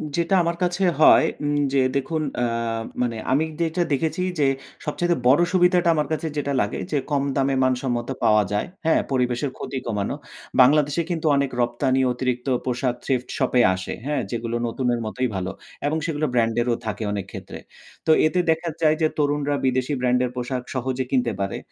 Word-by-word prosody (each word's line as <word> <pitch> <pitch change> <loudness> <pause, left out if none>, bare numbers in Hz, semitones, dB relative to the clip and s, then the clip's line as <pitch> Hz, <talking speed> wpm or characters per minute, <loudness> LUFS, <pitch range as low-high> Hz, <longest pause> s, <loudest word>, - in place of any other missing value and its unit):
যেটা 170 +3 +1
আমার 170 0 0
কাছে 180 +2 0 0.2
হয় - - +8 0.2
উম 145 0 0 0.2
যে 135 - +3 0.2
দেখুন 155 +3 -1 0.2
আ - - +2 0.6
মানে 115 -2 -1
আমি 145 +4 +3 0.2
যেটা 170 +2 0
দেখেছি 160 +5 -1 0.2
যে 140 - +4 0.4
সবচাইতে 175 +3 0
বড় 140 +6 +6
সুবিধাটা 180 -1 +4
আমার 150 - 0
কাছে 160 +1 -2
যেটা 140 -1 -1
লাগে 100 - -2
যে - - +1
কম 140 -1 +2
দামে 135 0 +1
মানসম্মত 125 -2 0 0.2
পাওয়া 105 -1 +5
যায়। 105 - 0 0.2
হ্যাঁ? 160 - +4
পরিবেশের 125 +1 0
ক্ষতি 135 - -5
কমানো। 105 +2 -2 0.5
বাংলাদেশে 145 +4 +4
কিন্তু 165 -2 -2
অনেক 140 -1 +1
রপ্তানি 130 +2 +1
অতিরিক্ত 125 +1 -2 0.2
পোশাক 125 0 -1
Thrift 125 -2 -1
শপ 130 -3 0
এ - - +7
আসে। 95 - -5
হ্যাঁ? 145 -2 0
যেগুলো 115 0 -3
নতুনের 120 0 -1
মতই 125 +4 -1
ভালো। 95 0 -2 0.4
এবং 155 +2 0
সেগুলো 155 -1 -1
ব্র্যান্ড 115 -2 +2
এরও 120 -1 +1
থাকে 110 0 -3
অনেক 100 -2 -3
ক্ষেত্রে। - - -8 0.5
তো 160 - +4
এতে 180 +3 +1
দেখা 165 +1 +1
যায় 155 -1 +4
যে 160 - +5
তরুণরা 145 -1 +1
বিদেশী 130 +2 +1
ব্র্যান্ডের 125 0 +2
পোশাক 125 0 -3
সহজে 130 0 -2
কিনতে 125 -3 +2
পারে। 100 0 -2
135 Hz, 175 wpm, -23 LUFS, 125-155 Hz, 0.6 s, হয়